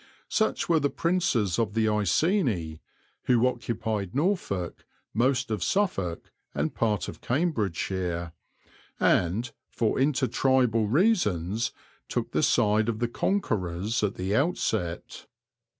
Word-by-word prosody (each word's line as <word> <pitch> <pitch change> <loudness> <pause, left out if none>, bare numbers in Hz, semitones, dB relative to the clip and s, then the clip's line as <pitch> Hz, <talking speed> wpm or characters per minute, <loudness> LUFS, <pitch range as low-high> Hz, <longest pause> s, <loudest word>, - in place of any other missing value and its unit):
Such 220 - 0
were 165 -2 +4
the 145 -1 +1
princes 165 - 0
of 110 -2 -1
the 110 -1 +2
Iceni, 105 - +1 0.5
who 125 -1 +4
occupied 115 -6 -2
Norfolk, 140 - -1 0.3
most 130 +2 +1
of 105 -5 -1
Suffolk, 95 - -1 0.2
and 75 +3 -1
part 105 -5 0
of - - -8
Cambridgeshire, 95 - -1 0.7
and, 105 +8 +2 0.2
for 115 +1 0
inter 135 0 +2
tribal 125 -5 +2
reasons, 115 - +1 0.4
took - - -2
the - - +1
side 105 +2 +3
of 110 - -1
the 120 +1 0
conquerors 110 - -1
at 100 -1 0
the 95 +3 -1
outset. 110 - -1
110 Hz, 120 wpm, -27 LUFS, 95-135 Hz, 0.7 s, were